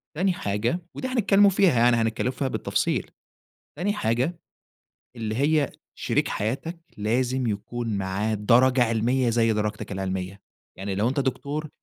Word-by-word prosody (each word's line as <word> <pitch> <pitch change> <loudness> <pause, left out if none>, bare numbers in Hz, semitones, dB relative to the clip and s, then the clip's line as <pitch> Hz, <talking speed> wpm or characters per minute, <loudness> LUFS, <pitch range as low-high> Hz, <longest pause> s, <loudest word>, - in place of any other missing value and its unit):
تاني 185 +2 +2
حاجة 110 - -1 0.2
وده 260 0 -4
هنتكلّم 205 -4 +5
فيها 185 -9 +3
يعني، 120 0 +5
هنتكلّم 115 +2 0
فيها 135 +1 -2
بالتفصيل. - - -1 0.7
تاني 200 +4 +1
حاجة، 130 - -1 0.8
اللي 110 -2 -3
هي 145 +3 +2 0.3
شريك - - 0
حياتك 135 - -3 0.2
لازم 125 +4 0
يكون 110 +1 -3
معاه 100 +3 -1
درجة 125 +5 +4
علمية 120 +2 +1
زي 115 -1 +2
درجتك 105 0 -3
العلمية. 95 0 -4 0.4
يعني 95 +1 -3
لو 105 +5 +1
أنت 135 +2 -1
دكتور 145 +3 -2
120 Hz, 135 wpm, -25 LUFS, 105-140 Hz, 0.8 s, هنتكلّم